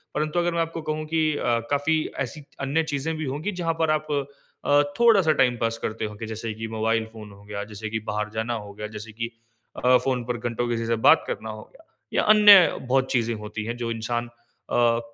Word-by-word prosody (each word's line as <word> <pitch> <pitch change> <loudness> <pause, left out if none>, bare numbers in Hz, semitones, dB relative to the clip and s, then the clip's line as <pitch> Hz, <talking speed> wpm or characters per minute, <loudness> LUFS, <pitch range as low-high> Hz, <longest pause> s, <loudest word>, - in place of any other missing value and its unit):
परन्तु 155 +3 0
अगर 175 0 0
मैं 170 - -1
आपको 165 0 -3
कहूँ 155 0 -2
कि 160 +1 0 0.2
अ, 120 -1 +1
काफ़ी 145 +3 +2 0.3
ऐसी 135 +6 -9 0.2
अन्य 145 +4 +1
चीज़ें 145 +3 -2
भी 155 - -3
होंगी, 150 +9 -3
जहाँ 165 -1 +1
पर 160 -1 +2
आप 155 0 0 0.6
अ, 145 0 +5 0.2
थोड़ा-सा 205 -9 +5
टाइम 125 -2 +3
पास 115 0 0
करते 110 0 -2
होंगे, 105 +1 -6
जैसे 110 0 -4
कि 110 +1 -5
मोबाइल 110 0 +1
फ़ोन 105 -2 -10
हो 100 0 -15
गया, 100 0 -5
जैसे 110 +1 -6
कि 110 0 -2
बाहर 105 0 -2
जाना 110 +2 -1
हो 105 -3 -6
गया, 105 +1 -6
जैसे 110 +1 -9
कि 115 +1 -4 0.6
अ, 125 0 +7
फ़ोन 125 -2 -1
पर 125 0 -2
घंटो 120 +1 -2
किसी 115 -1 -1
से 115 - +2
बात - - +7
करना 110 - -4
हो 110 0 -7
गया। 325 - -20 0.3
या - - +2
अन्य 205 -4 +8
बहुत 130 0 +2
चीज़ें 120 -2 +1
होती 105 0 -6
हैं 120 +2 -4
जो 120 -1 -3
इंसान 120 +1 -2
अ, 120 0 -1
120 Hz, 220 wpm, -25 LUFS, 110-155 Hz, 0.6 s, अन्य